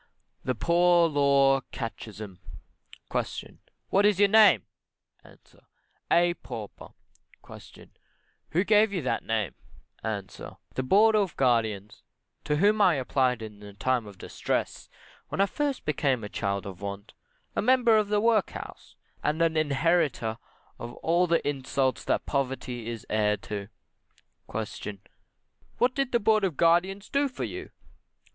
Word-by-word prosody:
THE 130 - -1
POOR 170 +4 +4
LAW 140 -2 +3
CATECHISM. 110 -5 -7 0.7
Q. - - -4 0.3
What 195 - +3
is 205 -2 +4
your 205 -1 +5
name? 215 +1 +6 0.6
A. - - -17 0.7
A 175 0 +4
Pauper. 120 - -9 0.6
Q. - - -13 0.6
Who 175 +4 +1
gave 210 0 +4
you 180 -6 -2
that 130 - -1
name? 110 - -1 0.5
A. 105 -3 -2 0.5
The - - -1
Board 210 +11 +4
of 200 -5 0
Guardians, 110 -5 0 0.4
to 150 - +1
whom 205 +6 +3
I 180 -5 +5
applied 130 -3 0
in 105 -2 -9
the 105 -1 -11
time 120 +2 -1
of 100 -2 -12
distress, - - -3 0.4
when 195 - +2
first 285 +5 -2
I - - -42
became 135 -5 0
a 105 - -6
child 100 -1 -2
of 95 -1 -8
want, 100 +1 -6 0.4
a - - +1
member 250 -3 +4
of 210 -1 +2
the 210 0 +2
workhouse, 220 -2 -1 0.3
and 150 +2 -1
an 165 -1 +1
inheritor 145 -6 +1 0.4
of 120 +1 -7
all 175 +2 +3
the 170 -2 +1
insults 135 -1 -1
that - - 0
poverty 125 -4 -3
is 115 -2 -6
heir 105 -1 +1
to. 100 0 -6 0.8
Q. 110 -1 -5 0.8
What 245 +1 +2
did 275 -1 -1
the 235 - +3
Board 215 -1 +3
of 175 -8 -1
Guardians 185 +4 +2
do 280 +1 +1
for 255 - -6
you. - - -6
140 Hz, 140 wpm, -27 LUFS, -, 0.8 s, name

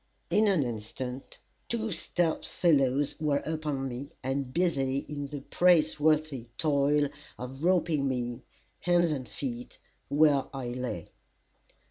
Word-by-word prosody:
In 215 +1 +4
an 185 -8 +3
instant, 125 +3 -5 0.3
two 225 -1 -1
stout 170 -3 0
fellows 140 -4 +2
were 150 -2 +1
upon 150 -4 -2
me, 130 +3 -6
and 135 0 -2
busy 140 -5 +1
in 145 -1 -4
the 145 -1 -6
praiseworthy 155 -5 +3
toil 145 -1 +3 0.3
of 130 +4 -7
roping 165 -5 +2
me, 120 -2 -2 0.4
hands 175 -2 +3
and 130 -6 -3
feet, 120 +2 -5 0.3
where 145 -2 +4
I 130 -3 -3
lay. 125 -9 -4
140 Hz, 120 wpm, -29 LUFS, 130-155 Hz, 0.4 s, In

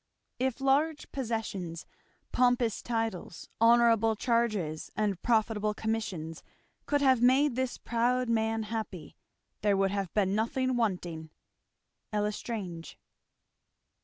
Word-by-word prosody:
If 260 0 0
large 290 +3 +1
possessions, 220 -9 -4 0.5
pompous 245 -3 +2
titles, 225 -7 -3
honourable 230 -1 +5
charges, 215 -9 0
and 205 -4 -1
profitable 215 -2 +1
commissions, 195 -8 -3 0.5
could 290 -1 +2
have 260 -4 +4
made 260 +2 +4
this 260 -1 -1
proud 245 +2 0
man 225 -1 +1
happy, 215 -5 -5 0.5
there 205 -1 +3
would 195 0 +2
have 195 -3 -2
been 195 -2 +2
nothing 255 +4 0
wanting. 175 -8 -2 0.8
L'Estrange. 210 -4 -3
225 Hz, 105 wpm, -30 LUFS, 200-245 Hz, 0.8 s, honourable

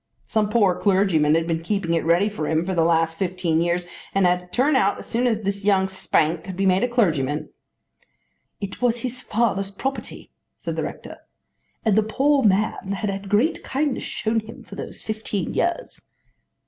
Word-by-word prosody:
Some 215 -2 0
poor 210 -5 +4
clergyman 185 -7 +3
had 165 0 +1
been 165 -1 -1
keeping 175 -1 -1
it 165 - +1
ready 170 +5 +3
for 200 -8 -3
him 160 +1 +1
for 190 - -2
the 170 - +2
last 165 0 +2
fifteen 180 -3 0
years 175 +1 0 0.3
and 195 -1 +4
had 180 0 +3
to 180 - -16
turn 265 +10 +2
out 200 -6 +3
as - - -9
soon 245 +2 0
as 220 -2 0
this 200 0 -2
young 195 -2 +3
spark 165 -3 0
could 185 -1 -7
be 195 - +1
made 190 +3 +3
a - - +3
clergyman." 155 - 0 1.1
"It 200 +2 -6
was 240 -1 +1
his 255 0 -4
father's 200 -4 0
property," 265 +7 -5 0.3
said - - -4
the - - -1
rector, - - -7 0.7
"and 215 -3 +3
the 220 - +5
poor 275 +6 +2
man 200 -2 +1
had 200 +1 -2
had 195 0 -6
great 235 - +2
kindness 280 0 -1
shown 225 0 -1
him 220 +1 -11
for - - -14
those - - -8
fifteen 215 -4 -3
years." 350 +9 -2
195 Hz, 190 wpm, -23 LUFS, 175-220 Hz, 1.1 s, the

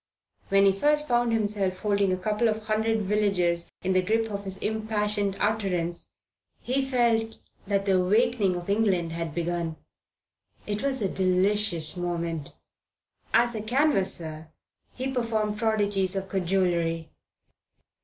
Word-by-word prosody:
When 195 0 +5
he 195 - +6
first 295 +9 +2
found 240 -1 +2
himself 205 -4 0
holding 200 -2 +2
a 185 - 0
couple 210 +5 0
of 220 0 -1
hundred 220 0 0
villagers 185 -4 +1
in 190 +1 +1
the 185 - +4
grip 225 +3 0
of 200 0 -5
his 190 0 -5
impassioned 210 -2 -1
utterance 185 -6 -1 0.5
he 260 +2 0
felt 235 -4 +1 0.3
that 200 -1 0
the 190 -2 +3
awakening 210 0 +2
of 175 0 -6
England 200 -5 +1
had 165 -2 -4
begun. 170 -1 -2 0.9
It 210 0 -2
was 265 -5 0
a - - +2
delicious 185 -2 +1
moment. 170 -4 -3 0.8
As 240 0 +3
a 215 - -3
canvasser 195 - 0 0.5
he 260 +1 -3
performed 220 -4 -1
prodigies 205 -4 +1
of 195 0 -3
cajolery. 170 -3 0
200 Hz, 135 wpm, -26 LUFS, 180-220 Hz, 0.9 s, he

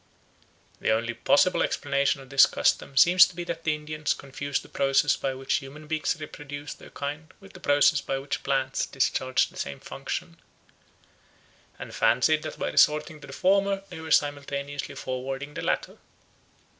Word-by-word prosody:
The - - -1
only 115 +2 +1
possible 185 +9 +3
explanation 140 -1 0
of 135 0 -15
this 135 - +7
custom 135 - 0
seems 180 +4 +8
to 180 - -13
be 175 - -4
that 170 -1 -6
the 155 -1 +2
Indians 150 0 -2
confused 140 0 -4
the - - -14
process 135 0 +2
by 135 -1 -3
which 135 0 0
human 145 +2 -9
beings 155 +1 -1
reproduce 145 -1 -7
their - - -15
kind 150 +3 -6
with 195 -1 -16
the 185 - -12
process 145 -2 +3
by 135 - -2
which 135 +1 -4
plants 135 -1 -1
discharge 130 -1 +1
the - - -15
same 70 - -5
function, - - -6 1.4
and - - -9
fancied 125 +7 +3
that - - -7
by - - -2
resorting 150 +1 +3
to 140 - -11
the - - -10
former 195 +3 +2
they 175 - -8
were 160 0 -8
simultaneously 145 -1 -1
forwarding 135 +3 -5
the - - -5
latter. - - -2
145 Hz, 170 wpm, -26 LUFS, 135-155 Hz, 1.4 s, seems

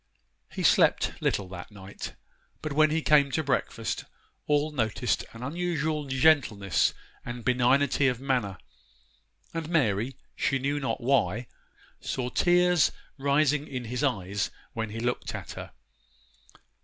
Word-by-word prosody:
He - - -4
slept - - +3
little 100 - 0
that 90 -1 -8
night, 100 -2 -9 0.5
but 155 -2 -3
when 155 +1 +5
he 160 +1 0
came 145 -2 +5
to 160 - +1
breakfast 125 -4 -1 0.4
all 150 +1 +2
noticed 120 -2 0
an 115 +1 -9
unusual 160 0 -1
gentleness 130 - +3 0.3
and 120 -1 -7
benignity 130 +3 +3
of 125 -2 0
manner; 125 -8 -1 1.0
and 165 -1 -4
Mary, 125 - +1 0.2
she 135 - +1
knew 140 +2 -1
not 135 -2 -2
why, 120 -3 +1 0.5
saw 125 -2 -3
tears 175 -2 +4 0.3
rising 145 +1 +2
in 125 -3 -5
his 125 +5 -3
eyes 105 -7 0 0.2
when 110 -1 -3
he 110 +2 -6
looked 120 +1 -2
at - - -7
her. - - -8
135 Hz, 130 wpm, -28 LUFS, 115-150 Hz, 1.0 s, when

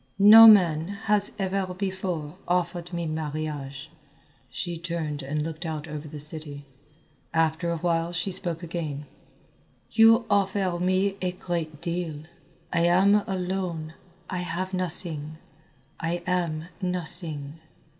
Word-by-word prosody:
"No 215 +3 +10
man 170 -7 +6 0.2
has 205 -1 +2
ever 190 -1 -1
before 185 -5 -3
offered 175 0 -1
me 170 -1 -3
marriage." 150 -2 -4 0.6
She 175 -2 -4
turned 165 -3 -3
and 145 +3 -2
looked 160 +2 -5
out 160 -2 -4
over 150 0 -6
the 150 +1 -8
city. 150 -1 -7 0.7
After 165 +1 +1
a 170 - -1
while 165 0 0
she 175 +3 -2
spoke 175 -2 -4
again. 155 -4 -4 0.9
"You 225 +1 +6
offer 195 -3 +1
me 185 +2 +1
a 180 -1 -1
great 165 -4 -4
deal. 170 -3 -3 0.5
I 170 - +2
am 190 +3 +5
alone, 180 -4 -3 0.3
I 185 - -3
have 185 +2 -3
nothing, 160 -4 -4 0.6
I 170 +1 -2
am 170 -3 -1 0.2
nothing." 165 -4 -4
170 Hz, 125 wpm, -26 LUFS, 155-185 Hz, 0.9 s, No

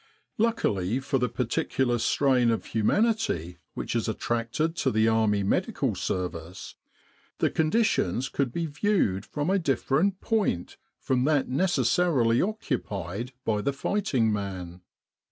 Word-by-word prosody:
Luckily 125 - +1
for 135 0 -1
the 125 -1 0
particular 120 +1 0
strain 125 0 +3
of 115 - 0
humanity 110 - 0 0.2
which - - -4
is 115 - 0
attracted 120 +8 -1
to - - +1
the 110 +1 +2
Army 110 -2 +2
Medical 95 - 0
Service, 90 -1 -4 0.6
the - - +1
conditions 155 - +1
could 135 -3 -1
be 170 +6 -2
viewed 145 - 0
from 150 +4 -2
a 195 - +3
different 165 +5 +1
point 210 - -1 0.2
from 130 -1 0
that 145 -4 +2
necessarily 145 -5 +2
occupied 120 - -3
by 105 -2 +1
the 140 +4 -2
righting 135 - +1
man. 95 -3 -5
125 Hz, 125 wpm, -27 LUFS, 105-160 Hz, 0.6 s, strain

